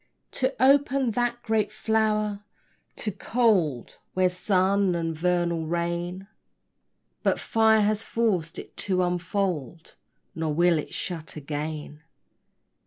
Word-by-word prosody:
To 260 0 -1
open 270 -1 +4
that 240 +1 -1
great 215 -2 +1
flower, 215 -1 0 0.5
too 210 - -3
cold 190 - +1 0.2
Were 185 0 +3
sun 190 +1 +2
and 165 -1 -2
vernal 170 -1 0
rain; 175 +2 -2 1.0
But - - +1
fire 220 -1 +3
has 210 +1 +1
forced 190 -8 0
it - - -9
to 185 -2 0
unfold, 175 - -2 0.4
Nor 160 -2 -2
will 170 -1 +4
it - - -6
shut 165 -4 -5
again. 150 0 -5
185 Hz, 110 wpm, -26 LUFS, 165-215 Hz, 1.0 s, open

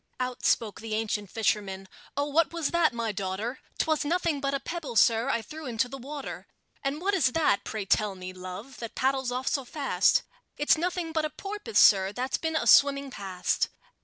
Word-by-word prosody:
Out 250 -1 -3
spoke 215 -3 +1
the 220 -1 -3
ancient 210 -2 -2
fisherman: 195 -3 -1 0.3
"Oh, 285 - +2
what 295 0 +2
was 335 -3 -2
that, 340 -4 +3
my 230 -2 -2
daughter?" 205 +5 -3 0.2
"'Twas 315 -1 +1
nothing 325 -2 0
but 275 0 0
a - - -1
pebble, 330 -5 -5
sir, 225 +3 +4
I 230 - 0
threw 310 +5 -8
into 235 +1 0
the 270 +2 -8
water." 280 +2 -7 0.4
"And 275 +2 -1
what 390 +4 0
is 275 -10 +2
that, 305 -11 +2
pray 215 -3 -4
tell 205 0 +1
me, 185 0 -7
love, 185 +8 -8
that 230 -2 -7
paddles 265 -1 +1
off 255 +1 -3
so 275 - +1
fast?" 275 +2 +2 0.3
"It's 295 - +4
nothing 345 0 -2
but 320 -1 0
a - - -2
porpoise, 415 +7 -5
sir, 190 -1 +6
that's 255 +4 -2
been 320 -1 -2
a - - +1
swimming 275 -1 +5
past." 190 -5 -1
265 Hz, 195 wpm, -28 LUFS, 215-305 Hz, 0.4 s, sir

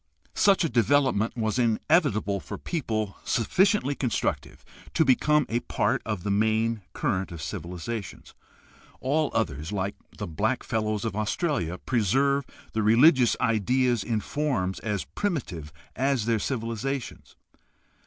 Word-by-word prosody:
Such 200 -3 +4
a - - +2
development 120 -2 +2
was 110 +1 0
inevitable 110 - +2
for - - -7
people 110 - -3
sufficiently 180 - +2
constructive 130 -4 -2 0.3
to 160 - +4
become 150 +3 +3
a 115 - 0
part - - 0
of 105 -5 -3
the 100 - -1
main 110 +2 +1
current 95 0 -1
of 85 - -7
civilization. 90 +7 -5 0.8
All 150 +3 +1
others, 80 -6 -1
like 100 -1 -2 0.2
the - - -4
Black 110 +10 -1
Fellows 110 -2 -1
of 110 - -2
Australia, 105 - -1
preserve 135 +6 +1 0.3
the 110 - 0
religious 120 +4 +5
ideas 120 0 +2
in 110 -3 -1
forms 120 -10 -1
as 105 -4 -2
primitive 110 - -3 0.2
as 135 -3 +1
their 115 -1 +1
civilizations. 120 +2 -4
115 Hz, 125 wpm, -26 LUFS, 105-135 Hz, 0.8 s, religious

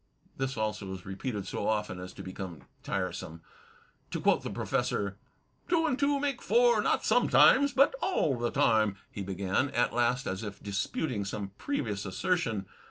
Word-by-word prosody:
This 135 -1 -2
also 105 -3 -2
is 90 - -11
repeated 100 +1 -4
so 100 - -3
often 105 -4 -1
as 90 0 -7
to - - -9
become 95 -3 -7 0.2
tiresome. 90 -3 -4 0.7
To - - -3
quote - - +3
the - - -5
Professor: 100 0 -1 0.5
"Two 335 -2 +3
and 265 -5 0
two 280 0 +2
make 275 -3 -1
four, 480 0 +4
not - - +1
sometimes^ 280 +1 +5
but 275 - +5
aU 260 - +1
the 120 - +1
time," 110 -4 +3 0.2
he 100 - -6
began, 95 +7 0
at 120 -1 +1
last 120 +2 +1
as 95 0 -3
if 105 -3 -7
disputing 100 +4 -2
some 100 0 -4
previous 110 - -2
assertion. 110 - 0
105 Hz, 165 wpm, -30 LUFS, 95-145 Hz, 0.7 s, sometimes^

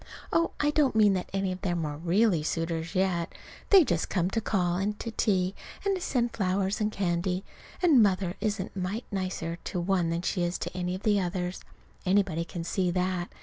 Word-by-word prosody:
Oh, 335 - +3
I 295 0 +2
don't 295 -5 +2
mean 210 -2 +5
that 185 -1 -2
any 195 -1 0
of 185 0 -6
them 175 -4 -1
are 145 -1 -3
really 175 +3 +2
suitors 165 +2 -2
yet. 185 -3 +1 0.4
They 390 -4 +8
just 175 - -1
come 180 -1 0
to 225 - 0
call 180 -5 +1
and 205 +2 -1
to 230 - -4
tea, 190 -4 +1 0.3
and 390 -2 +1
send 240 -7 0
her - - -12
flowers 195 +1 0
and 210 0 +1
candy. 180 -1 -1 0.4
And 305 -9 +6
Mother 190 -3 +2
isn't 205 -3 -1
a - - -3
mite 195 +6 -3
nicer 185 -3 -3
to 180 - -2
one 175 -1 +1
than 170 +1 -2
she 185 - 0
is 175 +1 0
to - - -5
any 180 0 -2
of 190 - -8
the 210 -2 +3
others. 180 0 -2 0.4
Anybody 185 -4 +2
can 170 0 -6
see 180 +2 0
that. 180 0 -1
185 Hz, 205 wpm, -28 LUFS, 175-205 Hz, 0.4 s, They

